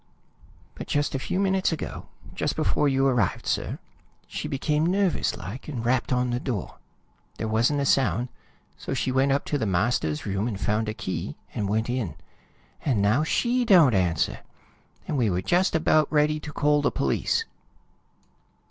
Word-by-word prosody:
"But - - -8
just 145 0 0
a 135 - -1
few 185 - -2
minutes 190 -2 +2
ago, 160 - -5 0.3
just - - -1
before 145 - +1
you 135 0 +2
arrived, 125 -9 +1
sir, - - -1 0.5
she - - -5
became 150 +3 0
nervous 185 +1 +1
like, 110 +9 -8
and 125 -7 -4
rapped 125 +1 +1
on 125 -1 +1
the 120 - -1
door. 120 -7 -4 0.6
There 110 - -3
wasn't 120 +7 +2
a - - 0
sound. 130 -2 +2 0.5
So - - -4
she 130 - 0
went 135 +1 +2
up 140 +1 +1
to 145 - -1
the 110 - -1
master's 90 -5 0
room 100 +2 -1
and 105 -5 -4
found 105 +2 0
a 110 - -4
key, 95 - -4 0.2
and 100 -2 -2
went 110 +2 0
in. 120 - -2 0.7
And 130 -7 +1
now 105 +9 +3
she 245 +9 +1
don't 175 - +6
answer, 90 -5 +1 0.7
and 150 - -1
we 115 -4 +2
were 90 0 -1
just 180 - +2
about 155 -2 +3
ready 155 0 +2
to 150 - -8
call 150 0 +2
the 145 - +2
police!" 455 - 0
130 Hz, 175 wpm, -25 LUFS, 110-150 Hz, 0.7 s, don't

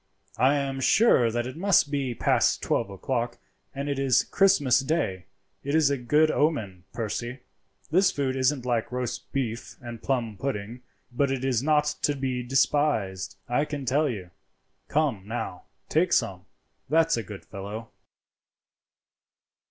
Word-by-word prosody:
I 130 +4 +4
am 135 -1 -2
sure 130 - +4
that 120 +1 -1
it 130 +1 -6
must 180 -4 +3
be 135 -4 -1
past - - +2
twelve - - 0
o'clock, 120 +4 -3 0.3
and 140 +1 -5
it 140 -1 -1
is 135 -3 +3
Christmas 165 -11 +3
day. 135 - -1 0.4
It 140 +2 -1
is 155 -3 +4
a 140 - +1
good 150 +6 +3
omen, 105 - -1
Percy. 120 +2 -4 0.5
This 185 +3 +5
food 135 -2 -1
isn't 130 0 +1
like 120 -2 -1
roast 125 -1 -4
beef 120 -4 -3
and 120 -2 -8
plum 120 -6 -1
pudding, 120 -1 -4 0.3
but 140 +3 +1
it 135 -1 -2
is 125 -4 +1
not 150 +1 +3 0.2
to 145 - +1
be 130 -2 -2
despised, 120 -7 +1
I 125 +4 +1
can 145 -2 -5
tell 145 +4 +2
you. 95 -7 -6 0.6
Come, 135 -10 0
now, 110 -5 -5 0.2
take 170 +2 +2
some; 90 -2 0 0.4
that's 165 +2 +3
a 115 - -2
good 105 -3 -10
fellow." 105 +3 -7
130 Hz, 150 wpm, -26 LUFS, 115-145 Hz, 0.6 s, This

